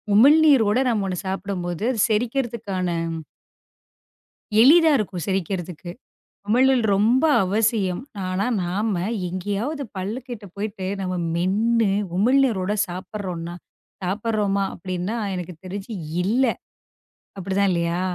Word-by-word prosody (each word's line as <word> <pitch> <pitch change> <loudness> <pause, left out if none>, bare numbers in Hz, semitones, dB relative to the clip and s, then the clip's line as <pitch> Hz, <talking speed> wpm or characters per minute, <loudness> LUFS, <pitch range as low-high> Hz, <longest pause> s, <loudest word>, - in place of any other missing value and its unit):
உமிழ்நீரோட 265 -3 +6
நாம 220 -4 0
ஒண்ணு 185 -1 -3
சாப்பிடும்போது 190 -1 -3 0.2
செரிக்கறதுக்கான 225 -5 -1 1.7
எளிதா 320 +6 +7
இருக்கும் 190 -6 -3
செரிக்கறதுக்கு. 180 -2 -3 0.6
உமிழ்நீர் 255 +2 +4
ரொம்ப 230 +7 +3 0.2
அவசியம். 205 -1 +1 0.3
ஆனா 185 +2 -1 0.2
நாம 200 +5 -1 0.4
எங்கையாவது 205 - -3
பல்ல 190 +3 -3
கிட்ட 235 -5 -7
போயிட்டு, 200 -1 -4 0.2
நாம 185 -1 -2 0.2
மென்னு 210 +5 +2 0.3
உமிழ்நீரோட 225 -3 +2
சாப்பிடுறோம்னா 180 -2 -6 0.5
சாப்பிடுறோமா 200 +1 0
அப்படின்னா, 185 +4 -4 0.2
எனக்குத் 180 -1 -7
தெரிஞ்சு 195 +4 -6 0.3
இல்ல. 235 +8 +2 0.9
அப்படிதான் 195 +1 0
இல்லையா? 170 0 0
200 Hz, 95 wpm, -23 LUFS, 185-230 Hz, 1.7 s, எளிதா